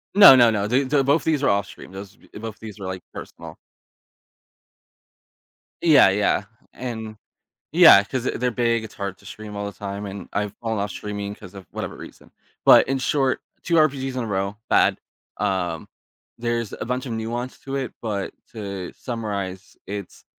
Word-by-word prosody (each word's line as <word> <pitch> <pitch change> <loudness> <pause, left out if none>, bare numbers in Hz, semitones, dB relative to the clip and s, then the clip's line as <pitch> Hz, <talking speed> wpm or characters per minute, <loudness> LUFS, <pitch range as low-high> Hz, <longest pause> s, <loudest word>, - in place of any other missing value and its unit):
No, 200 -10 +11
no, 120 -2 +6
no, 105 -1 0
the 130 +5 +2
the 135 +1 +2
both 145 +4 +3
these 155 -3 +1
are - - +2
off-stream, 100 -2 -2
those 95 0 -9 0.2
e - - -8
both 110 -1 -6
of - - -31
these 110 -2 -9
were, 95 - -6
like, 95 -1 -5
personal. - - -9 2.3
Yeah, 155 - +7
yeah, 105 +1 +1 0.3
and 110 -3 -6 0.6
yeah, 165 - +9
i 100 - +1
'cause 130 +2 -3
they're 125 0 0
big, 115 -1 +1
it's 110 - -10
hard 100 -2 -4
to - - -18
stream 105 -1 -9
all 100 - -3
the 100 - -5
time, 100 +2 -6
and 100 +1 -7
I've 105 -1 -1
fallen 110 -2 -2
off 100 0 -2
streaming 100 +1 -5
'cause 90 +2 -13
of 95 -3 -10
whatever - - -5
reason. - - -13 0.3
But, - - +7
in 135 0 +1
short, 135 -1 +1 0.2
2 170 - -1
RPGs 135 -4 +1
in 125 - -1
a - - -4
row, 100 0 -2
bad. - - +4 0.4
Um, 95 -5 -2 0.5
there's 120 -2 -2
a - - -5
bunch 125 +2 -3
of 120 - -4
nuance 120 +3 -4
to 135 0 -5
it, 130 -3 -3
but 105 -4 -3 0.2
to 100 -4 -6
summarize, 100 -6 -5
it's 100 -2 -7
110 Hz, 185 wpm, -23 LUFS, 100-125 Hz, 2.3 s, No